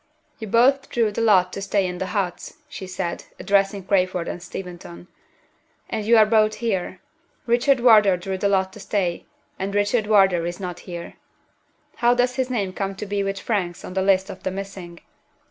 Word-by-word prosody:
"You 220 - -6
both 265 +6 +3
drew 230 -3 +1
the 220 - -3
lot 190 -5 +4
to 195 - -5
stay 195 0 0
in 180 -1 -4
the 190 - -2
huts," 190 -4 -3
she 195 -10 -8
said, 175 -2 -4
addressing 195 0 +1
Crayford 185 -2 0
and 175 - -5
Steventon. 175 -1 -9 0.8
"And 215 - -2
you 230 0 +6
are 215 - +7
both 215 0 +3
here. 190 -5 -2 0.5
Richard 245 +3 +3
Wardour 215 -6 +6
drew 190 +1 -4
the 200 - +1
lot 190 -1 +1
to - - -11
stay, 180 -5 -2 0.3
and 195 +1 -3
Richard 205 +2 +1
Wardour 195 -5 +4
is 175 +2 -5
not 180 -2 -5
here. 170 -1 -7 0.8
How 240 +1 +3
does 250 +1 +1
his 260 -1 0
name 200 -7 -2
come 195 0 -3
to 210 - -6
be 200 0 -2
with 195 0 -2
Frank's 185 -6 -2
on - - -8
the 190 - 0
list 190 0 +2
of - - -11
the - - -2
missing?" 190 -3 -8
195 Hz, 190 wpm, -23 LUFS, 185-215 Hz, 0.8 s, are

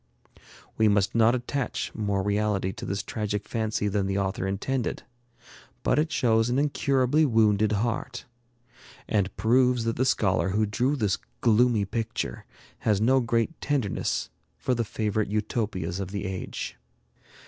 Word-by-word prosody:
'" - - -23
We 110 - +5
must 100 -2 +2
not 115 +1 +4
attach 125 +2 -3
more 100 -3 -1
reality 105 -2 0
to - - -8
this 95 0 -2
tragic 105 -2 -3
fancy 110 -2 -1
than 100 -1 0
the 95 0 -1
author 95 0 -1
intended, 115 +6 -2 0.8
but - - +2
it 155 +1 0
shows 115 -4 +2
an 125 - +1
incurably 140 0 +2
wounded 110 -5 +3
heart; 120 +3 -2 0.8
and 100 -3 0
proves 125 +3 +3
that 115 0 -1
the 130 - +2
scholar 95 -7 +2
who 105 +3 +1
drew 125 +7 0
this 105 -8 0 0.2
gloomy 115 -2 +4
picture 115 - -3 0.3
has 105 -3 +1
no 130 +5 +4
great 115 +5 -1
tenderness 135 -9 -1 0.3
for 130 - 0
the 120 -1 0
favorite 110 -1 -1
Utopias 105 -4 -2
of 95 -2 -4
the 100 +1 -4
age. 95 -1 -5
110 Hz, 150 wpm, -26 LUFS, 100-120 Hz, 0.8 s, We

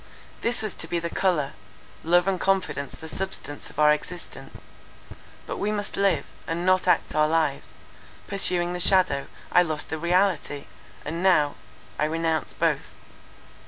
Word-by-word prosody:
This 235 -1 0
was 215 - -1
to 165 - -2
be 175 - -1
the 170 0 -3
colour; 160 -8 +1 0.5
love 175 +3 +4
and 190 -2 +1
confidence 190 -7 0
the 160 - -10
substance 160 -4 -5
of - - -16
our 150 0 +6
existence. 175 +3 -6 0.8
But - - -5
we 205 +1 0
must 205 -1 -2
live, 190 -8 +2 0.2
and 170 +2 -2
not 185 0 +3
act 180 - +2
our 155 0 +4
lives; 155 -3 0 0.5
pursuing 180 -3 +1
the 180 - -3
shadow, 180 -6 +3 0.2
I 180 - +6
lost 155 -4 -2
the 160 - -2
reality—now 170 -2 0 0.5
I - - +3
renounce 160 -1 -1
both. - - 0
170 Hz, 145 wpm, -25 LUFS, 155-185 Hz, 0.8 s, our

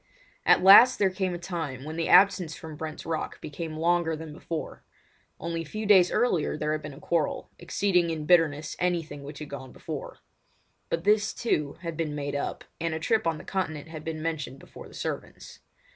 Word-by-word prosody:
At - - +6
last 220 +7 +9
there 195 -2 +2
came 185 -1 -2
a - - -3
time 165 -7 -5
when 155 +2 -6
the 165 0 -1
absence 185 -4 +5
from 160 -1 -9
Brent's 155 0 -6
Rock 160 -1 -3
became 155 +1 -6
longer 170 0 +2
than 155 -1 -8
before. 160 +1 -6 0.6
Only 165 0 -3
a - - -4
few 215 +7 -5
days 190 -4 +6
earlier 175 -12 +1
there 150 0 -1
had 155 0 -1
been 150 -2 -8
a - - -12
quarrel, 165 -2 -1
exceeding 180 -4 +1
in 155 -2 -3
bitterness 155 -3 +3
anything 170 -5 -1
which 140 +1 -9
had 150 -1 -8
gone 130 -2 -7
before; - - -7 0.7
but 165 0 -1
this, 210 +2 +2
too, 150 -11 0
had 170 -2 -4
been 155 -2 -2
made 145 -1 -3
up, 140 - -3 0.2
and 165 -1 -1
a - - -3
trip 220 +3 +1
on 165 -1 0
the - - -10
Continent 160 -5 -3
had 155 -1 -8
been 155 -1 -4
mentioned 150 -5 -3
before - - -12
the - - -15
servants. - - -6
160 Hz, 200 wpm, -27 LUFS, 150-180 Hz, 0.7 s, last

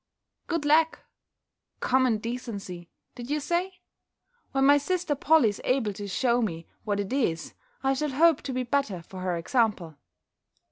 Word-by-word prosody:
"Good 335 -3 -1
lack! 315 +2 +4 0.8
Common 255 -3 +2
decency, 210 -7 -6 0.2
did 240 0 -9
you 300 +1 0
say? 355 +4 -2 0.7
When 270 0 +2
my 285 +1 +6
sister 355 +1 -1
Polly 290 -3 +4
is 205 - -6
able 250 -5 +1
to 205 +1 -6
shew 240 +4 +1
me 165 -7 -3 0.2
what 205 -2 -1
it 200 +3 -3
is, 175 -12 -1 0.3
I 270 0 +3
shall 300 +2 -1
hope 315 +3 +4
to 270 - -5
be 255 0 -1
better 245 -9 -1
for 185 +2 -10
her 180 -2 -1
example." 210 -4 0
255 Hz, 155 wpm, -27 LUFS, 205-290 Hz, 0.8 s, my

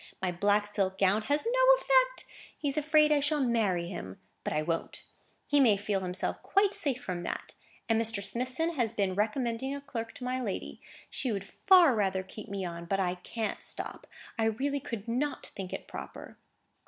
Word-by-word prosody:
My 185 -1 -1
black 205 +4 +2
silk 195 -2 -1
gown 195 +3 +3
had 285 +7 +1
no - - +6
effect. - - +2 0.3
He's 285 -2 -2
afraid 305 0 +4
I 295 - +5
shall 295 +1 +1
marry 215 -9 +1
him. 95 - -7 0.2
But - - -2
I 150 0 0
won't; 165 +1 -3 0.4
he 290 - +3
may 225 -7 +5
feel 205 -1 -1
himself 185 0 -1
quite 395 0 +2
safe 275 -5 +1
from 180 -5 -3
that. - - -5 0.3
And 225 0 +3
Mr. 225 -3 -2
Smithson 255 - -1
has 235 -7 0
been 195 -4 0
recommending 230 +5 -1
a - - -5
clerk 230 -5 -6
to - - -9
my 255 +1 -1
lady. 210 -6 -4 0.3
She 255 - -2
would 200 -2 -2
far 355 - +5
rather 190 -3 0
keep 215 +3 -10
me 195 -1 -3
on; 170 -1 -6
but 195 +3 0
I 180 -2 +1
can't 210 +4 -4
stop. - - -1 0.3
I 225 - +3
really 270 +6 0
could 230 -4 -6
not 265 +5 -1
think 190 -2 -8
it - - -6
proper." - - -9
225 Hz, 190 wpm, -30 LUFS, 195-280 Hz, 0.4 s, no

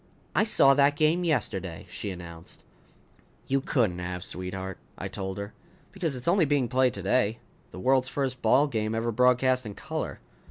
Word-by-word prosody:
"I - - +3
saw 140 -10 +6
that 140 +1 +4
game 155 +4 +2
yesterday!" 100 - -2
she 100 +3 -6
announced. 85 -2 -10 0.8
"You 135 0 +1
couldn't 110 -11 0
have, 90 0 -4
sweetheart," 95 0 -6 0.2
I - - -4
told 95 0 -5
her. 100 +1 -6 0.4
"Because 175 -6 -2
it's 125 +3 -5
only 175 -1 +4
being 140 -3 +1
played 130 +1 +2
today. 115 -3 +1 0.3
The - - -10
world's 130 +4 +3
first 130 -1 -3
ball 125 +6 +4
game 110 -4 -2
ever 115 +1 -1
broadcast 125 +2 +3
in 105 -3 -7
color." - - -4
125 Hz, 165 wpm, -27 LUFS, 95-135 Hz, 0.8 s, saw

